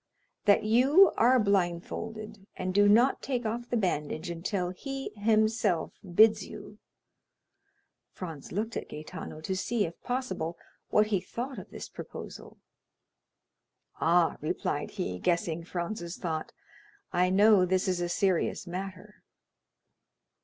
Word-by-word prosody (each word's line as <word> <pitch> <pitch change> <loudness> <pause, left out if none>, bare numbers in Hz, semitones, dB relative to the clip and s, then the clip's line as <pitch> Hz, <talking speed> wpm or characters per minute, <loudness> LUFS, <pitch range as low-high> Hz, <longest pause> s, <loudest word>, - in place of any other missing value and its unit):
"That 200 -1 +5
you 270 - +6
are 250 +2 +5
blindfolded, 200 +2 -2
and 185 0 -3
do 205 +1 +5
not 240 +6 +4
take 250 -3 -2
off 235 +2 -3
the 240 - +1
bandage 170 -3 -1
until 180 +1 -2
he 270 +8 -5
himself 215 -4 +1 0.2
bids 220 +2 +6
you." - - -10 1.3
Franz 165 -6 -8
looked 220 +4 -2
at - - -5
Gaetano, 155 0 -8
to 190 +4 -2
see, 215 +3 0
if 165 0 -9
possible, 245 -10 -3 0.3
what 210 - +4
he 205 -4 0
thought 255 +7 -5
of - - -11
this - - -8
proposal. - - -9 1.4
"Ah," 170 0 +3
replied - - -2
he, 90 0 -4
guessing 170 - 0
Franz's 175 0 -4
thought, 160 -2 -3 0.6
"I 180 +1 +3
know 200 +1 +6
this 185 +2 +1
is 180 -1 0
a 175 - -1
serious 185 0 0
matter." 190 +3 -7
195 Hz, 125 wpm, -29 LUFS, 175-220 Hz, 1.4 s, you